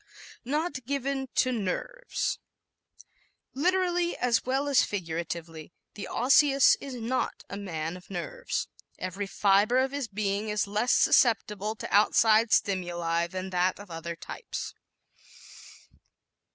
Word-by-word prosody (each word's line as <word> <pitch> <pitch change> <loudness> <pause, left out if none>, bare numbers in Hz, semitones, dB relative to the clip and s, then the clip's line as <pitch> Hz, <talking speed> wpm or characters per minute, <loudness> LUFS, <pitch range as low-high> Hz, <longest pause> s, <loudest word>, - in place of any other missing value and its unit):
Not 290 0 -2
Given 275 -1 -2
to 255 - +3
"Nerves" 250 - -2 0.6
¶ - - -18 0.5
Literally 355 +3 +1
as 245 -2 +1
well 270 +3 0
as 280 -3 +5
figuratively 165 -3 -5 0.2
the 205 - -7
Osseous 275 +2 +5
is 270 -2 -6
not 245 +2 -2
a - - -4
man 165 -4 -4
of 180 - -13
"nerves." - - -3 0.3
Every 185 +2 -4
fiber 200 +4 +3
of 265 +1 +2
his 280 -3 -3
being 205 0 -2
is 210 -1 0
less 210 +4 0
susceptible 215 -3 +3
to - - -7
outside 220 +2 +4
stimuli 175 -3 +1
than 185 +1 -5
that 180 +1 +1
of 205 -3 -11
other 165 +1 -5
types. - - -7
210 Hz, 125 wpm, -28 LUFS, 185-265 Hz, 0.6 s, as